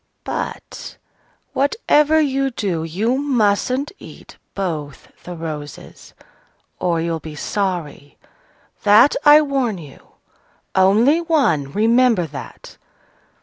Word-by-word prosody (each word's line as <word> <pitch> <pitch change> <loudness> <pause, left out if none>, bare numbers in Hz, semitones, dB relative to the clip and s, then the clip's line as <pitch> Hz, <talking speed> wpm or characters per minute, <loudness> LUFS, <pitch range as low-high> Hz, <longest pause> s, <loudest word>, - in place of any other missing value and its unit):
But, - - -6 0.6
whatever 300 - +2
you 275 -2 +1
do, 190 -9 -3
you 215 +11 -1
mustn't 255 0 0
eat - - -13 0.2
both 155 -8 -5
the 180 - -7
roses, 150 -4 -8 0.6
or 170 -2 0
you'll 165 0 -2
be 155 -1 -9
sorry, 170 -5 -4 0.6
that 215 +7 +5
I 300 +1 +8
warn 265 -7 -1
you! 150 -5 -14 0.6
Only 220 - +4
one: 245 - +1
remember 230 - +3
that!" 150 -3 -10
205 Hz, 100 wpm, -19 LUFS, 165-270 Hz, 0.6 s, I